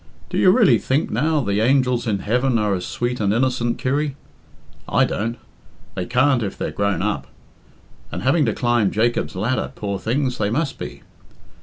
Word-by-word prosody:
Do - - 0
you 185 - +6
really 220 0 +5
think, 140 +5 0
now, 155 -1 +1
the 100 -4 0
angels 125 -1 +2
in 105 -3 +1
heaven 125 +5 +1
are 105 -2 +1
as 90 -2 -3
sweet 120 +1 -2
and 100 -2 +1
innocent, 120 0 0
Kirry? 140 +2 -1 0.7
I - - +3
don't. 115 +3 -3 0.6
They 90 -1 -4
can't 130 0 +3
if 100 -3 -4
they're - - -3
grown 100 -3 -1
up. 105 0 -2 0.8
And - - -5
having 140 +5 +3
to 115 - 0
climb 120 -5 +2
Jacob's 115 0 0
ladder, 120 +8 -1
poor 100 -2 -3
things, 125 +2 -1
they 100 -1 +1
must 140 +5 -2
be. - - -7
120 Hz, 175 wpm, -21 LUFS, 105-130 Hz, 0.8 s, you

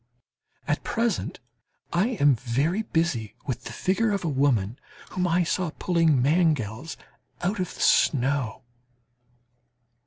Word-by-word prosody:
At - - 0
present 230 -3 -1 0.5
I 175 +6 +3
am 145 -1 +6
very 135 - 0
busy 160 - -1
with 130 -5 -4
the - - -6
figure 195 - 0
of 200 -2 -1
a - - +1
woman 130 -5 +1 0.3
whom 180 -1 0
I 175 +1 +2
saw 175 +1 -1
pulling 165 -6 +2
mangels 150 - +1 0.5
out 195 +4 0
of 180 - -3
the - - -8
snow. 135 -3 +2
160 Hz, 125 wpm, -26 LUFS, 130-180 Hz, 0.5 s, am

